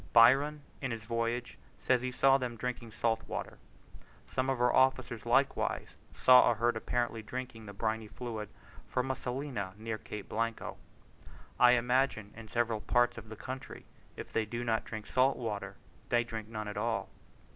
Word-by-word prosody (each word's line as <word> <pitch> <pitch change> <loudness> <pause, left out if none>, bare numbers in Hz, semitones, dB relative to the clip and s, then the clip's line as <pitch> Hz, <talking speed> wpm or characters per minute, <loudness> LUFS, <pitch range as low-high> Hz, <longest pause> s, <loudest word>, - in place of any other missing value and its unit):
Byron, 140 +6 +6 0.2
in 130 - -1
his 115 -2 -4
voyage 115 +2 -2 0.2
says 125 -2 +2
he 125 0 -2
saw 135 +1 +5
them 125 -2 -3
drinking 120 -1 -4
salt 115 +1 0
water. - - -5 0.7
Some 130 0 +1
of 135 -2 0
our 125 0 +3
officers 130 -4 +2
likewise - - +1 0.2
saw 125 -1 +7
a - - +2
herd 120 0 +1
apparently 115 0 -1
drinking 115 -1 -6
the 100 - -7
briny 110 +1 -2
fluid 110 -2 -6 0.4
from 130 +1 0
a - - -1
salina 125 -8 -4
near 110 0 -4
Cape 105 -2 -7
Blanco. 115 +1 -2 0.8
I 125 0 +8
imagine 125 -3 +1
in 115 0 -10
several 115 -1 0
parts 120 +1 +2
of 110 -1 -13
the 110 - -7
country, 130 +4 -7 0.3
if - - -8
they 115 - +2
do 120 +2 -3
not 110 -2 0
drink 110 -1 -6
salt 130 +3 +3
water, 110 -4 -4 0.3
they 120 0 +3
drink 110 -2 -6
none 110 -1 -5
at 105 - -5
all. 115 +2 -1
120 Hz, 170 wpm, -32 LUFS, 110-125 Hz, 0.8 s, I